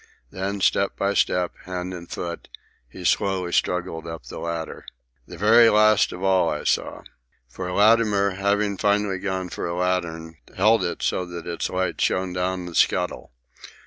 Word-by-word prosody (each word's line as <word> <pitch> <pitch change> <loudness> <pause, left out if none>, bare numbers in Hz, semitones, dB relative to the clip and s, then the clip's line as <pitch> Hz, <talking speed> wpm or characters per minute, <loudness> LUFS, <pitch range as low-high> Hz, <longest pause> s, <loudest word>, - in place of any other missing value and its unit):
And - - -11
then, 100 +1 -2
step 100 +1 +2
by 100 0 0
step, 90 -3 +1
hand 90 0 -5
and 85 -1 -9
foot, 85 -1 -6 0.4
he 90 +7 -10
slowly 95 -1 +1
struggled 85 -2 -1
up 80 0 -7
the - - -8
ladder. 85 -1 -5 0.4
The - - -10
very 115 +3 +6
last 110 -1 +4
of 90 - -8
all, 95 -3 +3
I 75 - -3
saw. - - -1 0.4
For 90 +9 -6
Latimer, 105 0 +3
having 100 +1 0
finally 100 -1 +1
gone 95 -2 -3
for - - -4
a 85 - -3
lantern, 85 -3 -2 0.2
held 105 +1 +4
it 85 - -3
so 90 - 0
that 85 -1 -8
its 85 -1 -3
light 95 -1 -2
shone 95 -1 0
down 90 0 -2
the 85 - -8
scuttle. 90 -7 0
90 Hz, 170 wpm, -23 LUFS, 85-100 Hz, 0.4 s, very